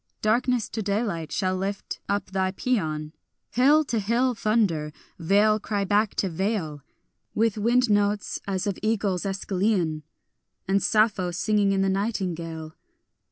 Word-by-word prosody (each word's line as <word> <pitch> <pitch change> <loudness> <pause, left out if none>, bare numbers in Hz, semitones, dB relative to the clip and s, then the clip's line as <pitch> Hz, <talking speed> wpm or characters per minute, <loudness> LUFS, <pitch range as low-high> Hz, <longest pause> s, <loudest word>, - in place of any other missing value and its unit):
Darkness 240 +1 +2
to 225 - -4
daylight 200 -5 -2
shall 185 -1 0
lift 195 +2 -4
up 200 -1 -1
thy 190 -1 0
pæan, 155 -9 -2 0.4
Hill 285 +5 +5
to 235 -6 -1
hill 235 +5 +1
thunder, 205 -9 0 0.3
vale 205 +5 +3
cry 205 -1 -2
back 205 +2 +1
to 195 - 0
vale, 170 -4 -2 0.5
With 225 -1 +2
wind 245 +4 +3
notes 205 -1 +1
as 190 0 -1
of 200 -3 -2
eagles 205 -4 0
Æschylean, 190 -4 0 0.7
And 195 +1 +2
Sappho 210 -4 +2
singing 205 +3 +1
in 195 0 +2
the - - +1
nightingale. 170 -6 -3
200 Hz, 135 wpm, -25 LUFS, 185-220 Hz, 0.7 s, Hill